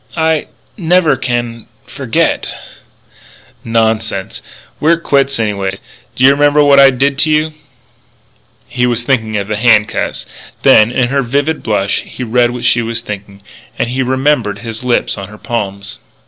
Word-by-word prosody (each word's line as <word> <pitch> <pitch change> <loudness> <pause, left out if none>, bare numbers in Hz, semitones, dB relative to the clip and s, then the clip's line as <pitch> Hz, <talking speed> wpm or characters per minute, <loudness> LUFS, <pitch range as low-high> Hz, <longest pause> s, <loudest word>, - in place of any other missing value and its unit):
"I 160 -1 +1 0.3
never 175 -5 +2
can 120 -3 -3 0.2
forget - - -1 0.6
" - - -26 0.2
"Nonsense. 110 -3 -2 0.4
We're 165 +2 +3
quits 140 -5 +1
anyway. 100 -3 -1 0.5
Do 130 - -1
you 135 - +8
remember 145 +1 +3
what 140 -1 +5
I 135 0 +8
did 135 +1 0
to 155 - +2
you?" 155 +1 +1 1.1
He 125 -1 0
was 120 -1 -1
thinking 110 -5 0
of 100 -1 -3
the 105 0 -2
handcuffs. 110 -1 +1 0.4
Then, 110 +2 +5
in 125 -1 0
her 140 +1 +1
vivid 140 +5 -1
blush 100 -3 0
he 125 - -8
read 120 +1 +2
what 120 0 -5
she 120 - +3
was 115 0 -3
thinking. 100 -2 -8 0.3
And 120 - -1
he 130 +2 -2
remembered 130 -5 0
his 115 +1 -6
lips 125 -4 0
on 100 - -6
her 105 +2 -13
palms. 100 -4 -5
120 Hz, 155 wpm, -14 LUFS, 110-140 Hz, 1.1 s, you